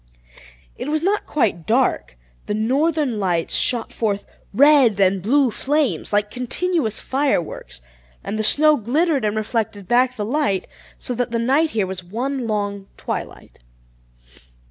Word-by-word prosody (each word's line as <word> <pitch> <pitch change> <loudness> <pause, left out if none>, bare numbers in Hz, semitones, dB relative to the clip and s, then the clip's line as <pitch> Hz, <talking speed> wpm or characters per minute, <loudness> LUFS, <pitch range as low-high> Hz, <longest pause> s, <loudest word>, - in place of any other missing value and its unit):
It 285 - -5
was 310 +1 -1
not 405 +3 0
quite 200 - -1
dark; 235 - 0 0.3
the 210 - -1
northern 270 +2 0
lights 175 -4 -1
shot 235 -2 +1
forth 205 -3 -2 0.3
red 265 -3 +5
and 190 0 +3
blue 260 +5 +2
flames, 290 +4 -1
like 210 0 +1
continuous 255 - 0
fireworks, 260 - -2 0.4
and 215 - -4
the - - 0
snow 305 +7 +5
glittered, 280 +4 0
and 210 0 0
reflected 215 -3 -3
back 250 +2 +2
the 210 - -3
light, 240 -6 -1 0.3
so 250 - -4
that 245 +1 -2
the 230 - -2
night 270 +7 +2
here 205 - +2
was 185 -1 -6
one 245 +7 -3
long 205 -2 -3
twilight. - - -6
235 Hz, 145 wpm, -21 LUFS, 205-285 Hz, 0.4 s, red